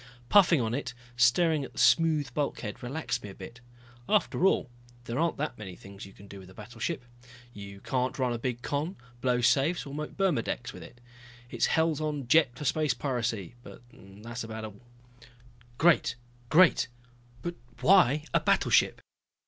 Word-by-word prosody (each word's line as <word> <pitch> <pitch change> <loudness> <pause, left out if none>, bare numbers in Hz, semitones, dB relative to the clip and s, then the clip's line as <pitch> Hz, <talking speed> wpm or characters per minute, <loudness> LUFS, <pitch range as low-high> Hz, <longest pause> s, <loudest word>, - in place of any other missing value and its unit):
Puffing 180 -6 +6
on 115 -1 -1
it, 125 -2 -4 0.2
staring 145 +6 +3
at - - -9
the - - -18
smooth 155 -6 +3
bulkhead, 140 -7 -3
relaxed 140 +6 -3
me 105 - -8
a 95 - -11
bit. 115 +6 -11 0.5
After 205 -3 +2
all 195 - +1 0.4
there 120 +2 -4
aren't 165 0 0
that 145 -5 -4
many 95 -4 -8
things 100 +2 -11
you - - -14
can 100 +1 -16
do 100 0 -10
with 95 -1 -13
a 95 - -16
battleship. 120 +6 -5 0.5
You 100 -1 -10
can't 130 0 -1
run 125 -3 0
a 120 - -4
big 120 0 -3
con, 150 +5 -2 0.3
blow 125 -1 +1
safes 145 +8 +2
or 140 - -8
make 150 +1 -6
burmedex 145 - -1
with - - -10
it. 120 - -13 0.5
It - - -6
is - - +3
hell 160 0 +2
on 145 -4 -3
jets 135 -4 +4
for 150 - -6
space 150 +1 +1
piracy, 120 - -3
but 120 - -13
that's 105 +6 -9
about 110 0 -6
all. 105 -1 -11 1.0
"Great, 165 -6 +3 0.3
great 165 -3 +5 0.6
but 175 - -3 0.3
why 155 -3 +5
a - - +4
battleship?" - - +2
125 Hz, 175 wpm, -29 LUFS, 115-155 Hz, 1.0 s, Puffing